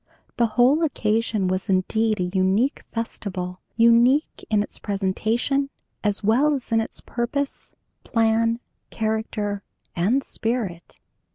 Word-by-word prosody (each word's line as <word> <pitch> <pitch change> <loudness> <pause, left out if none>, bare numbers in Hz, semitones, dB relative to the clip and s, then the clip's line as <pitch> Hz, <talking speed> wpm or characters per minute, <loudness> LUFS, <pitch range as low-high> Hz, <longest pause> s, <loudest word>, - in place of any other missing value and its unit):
The 235 - +4
whole 260 +6 +5
occasion 220 -7 0
was 185 +2 -2
indeed 215 +3 +1
a - - +1
unique 190 +8 +2
festival, 185 -5 -4 0.2
unique 235 +6 +4
in 210 -2 +3
its - - -7
presentation, 220 +8 0 0.3
as 210 -1 0
well 265 +8 +3
as 255 -3 -7
in 225 0 +4
its 225 - -6
purpose, 270 +4 -3 0.3
plan, 230 0 +2 0.3
character, 215 -2 -2 0.3
and 220 +11 +2
spirit. 220 -8 -3
225 Hz, 115 wpm, -24 LUFS, 200-240 Hz, 0.3 s, whole